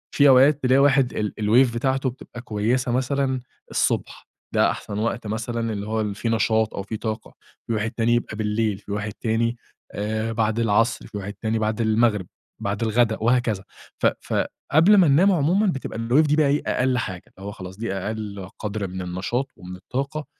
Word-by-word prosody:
في 145 -1 +6
أوقات 135 +2 +5
تلاقي 130 +2 +4
واحد 135 -2 +4
ال 105 -1 -2
الWave 115 +3 +4
بتاعته 130 +2 0
بتبقى 120 -1 -10
كويسة 120 +3 0
مثلًا 130 +1 0 0.3
الصبح، - - -1 0.3
ده - - +4
أحسن 105 0 -5
وقت 115 0 -2
مثلًا 115 +1 -2
اللي 100 0 -5
هو 110 0 -1
اللي 105 -2 -2
فيه 115 - -2
نشاط 110 -1 +1
أو 100 - -4
فيه 110 - -5
طاقة، 110 0 -5 0.3
في 115 - -1
واحد 110 0 -1
تاني 115 0 +1
يبقى 120 -2 -2
بالليل، 105 -1 0
في 100 - -11
واحد 105 0 -3
تاني 115 +2 -1 0.3
آآ 110 +2 -2
بعد 110 0 0
العصر، 115 +1 +1
في 105 - -7
واحد 100 +1 -5
تاني 110 0 -2
بعد 110 +1 -1
المغرب، 110 -3 +2 0.3
بعد 100 +3 -2
الغدا 110 0 +2
وهكذا، 115 -4 +1 0.4
ف - - +4
ف - - -6 0.4
قبل 165 +8 +6
ما 185 -4 +6
ننام 170 +8 +5
عمومًا 180 +6 +2
بتبقى 135 -9 -3
الWave 130 +7 +3
دي 150 - +3
بقى 150 -1 +3
أقل 125 0 +1
حاجة، 95 -6 -4
اللي 95 - -8
هو - - -4
خلاص 95 -1 -9
دي 115 -3 -3
أقل 100 -1 -5
قَدْر 105 -2 -3
من 95 +1 -6
النشاط 95 +9 -2
ومن 90 +1 -9
الطاقة، 140 +10 -4
115 Hz, 190 wpm, -23 LUFS, 105-130 Hz, 0.4 s, في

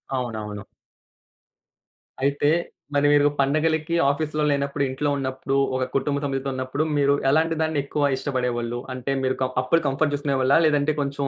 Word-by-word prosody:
అవునవును. 110 -5 -4 1.6
అయితే, 140 +1 +2 0.4
మరి 145 0 +3
మీరు 145 0 +5
పండగలకి 155 +3 +1
ఆఫీసులో 150 +1 -1
లేనప్పుడు, 140 0 -1
ఇంట్లో 145 +3 -1
ఉన్నప్పుడు 135 0 -3 0.2
ఒక 130 - 0
కుటుంబ 140 +1 0
సభ్యులతో 135 -1 -2
ఉన్నప్పుడు, 130 +3 -2
మీరు 140 0 +3 0.2
ఎలాంటి 160 +3 +2
దాన్ని 160 -2 0
ఎక్కువ 145 +1 0
ఇష్టపడేవాళ్ళు. 120 -3 -2
అంటే, 130 +2 -3
మీరు 130 0 +1
క - - +3 0.2
అప్పుడు 165 +6 +2
కంఫర్ట్ 145 +2 0
చూసుకునేవాళ్ళా? 140 0 +2
లేదంటే 150 0 +2
కొంచెం 140 0 -2
140 Hz, 140 wpm, -24 LUFS, 130-145 Hz, 1.6 s, మీరు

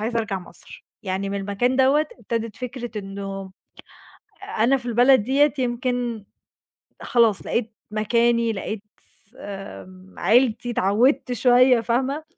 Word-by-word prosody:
عايزة 230 +2 -1
أرجع 200 -4 -2
مصر، 345 - -13 0.2
يعني 190 0 -3
من 200 0 -3
المكان 205 +6 0
دوّة 275 +4 +3
ابتدِت 230 -1 -4
فكرة 245 -3 -6
إنه 195 -1 -7 1.1
أنا 240 +5 +4
في 245 -2 -8
البلد 245 0 +4
ديّة 280 +5 +2
يمكن 245 -3 -2 0.8
خلاص 230 -6 +2
لقيت 230 -1 -2 0.2
مكاني، 230 +1 +1
لقيت 210 +1 -5 0.2
س 195 - -16
آمم، 190 -1 -10
عيلتي، 245 0 +2
اتعوّدت 245 +7 +2
شوية 245 +1 +5
فاهمة، 265 +6 -1
235 Hz, 120 wpm, -23 LUFS, 205-250 Hz, 1.1 s, شوية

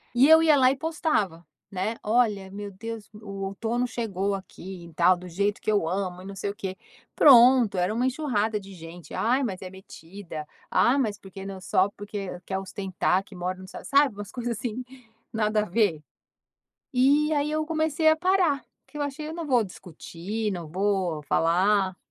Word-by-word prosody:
E 265 +4 +6
eu 320 0 +8
ia 310 -2 +5
lá 260 0 +5
e - - -1
postava, 265 - -1 0.3
né, 195 +4 -2
"Olha 210 -4 +1
meu 205 0 -6
Deus, 225 +2 -7
o 200 -2 -6
outono 230 +5 -2
chegou 200 -5 -2
aqui 190 -2 -9
e 165 - -14
tal, 175 +3 +5
do 180 +1 -10
jeito 200 +4 -1
que 215 - 0
eu 200 -6 +1
amo 185 -1 -2
e - - -11
não 195 0 -8
sei 200 +1 -3
o 200 - -5
quê". 190 -3 -5 0.4
Pronto, 245 -6 +7
era 180 +4 +1
uma 245 +3 0
enxurrada 225 -7 0
de 195 0 -12
gente, 165 -2 -11
ai 255 +4 +1
mas 195 -6 -3
é 185 - -6
metida, 175 -3 -10 0.2
ah, 255 +4 +3
mas 215 -6 0
porque 195 0 -10
não 195 -1 -6
só 185 +1 +2
porque 200 -3 -6
quer 190 - -2
ostentar, 190 -1 -1
que 195 - -15
mora 180 +1 -3
nos 185 0 -11
Estados - - -9
Un 280 - +2
sabe, 280 -7 +4
umas 205 0 -8
coisas 240 -2 -3
assim 245 +2 -4 0.5
nada 215 -1 +1
a - - -4
ver. 180 -6 +1 0.9
E 285 +5 +3
aí, 290 +1 0
eu 310 0 -1
comecei 315 0 +1
a 315 - +5
parar, 360 -5 +2 0.2
porque - - -14
eu - - -1
achei 295 +2 -4
eu 320 - -6
não 335 -2 -5
vou 245 -5 +3
discutir, 190 +4 -5
não 170 -4 -6
vou 185 -3 0
falar. 185 +5 +2
205 Hz, 195 wpm, -26 LUFS, 185-250 Hz, 0.9 s, eu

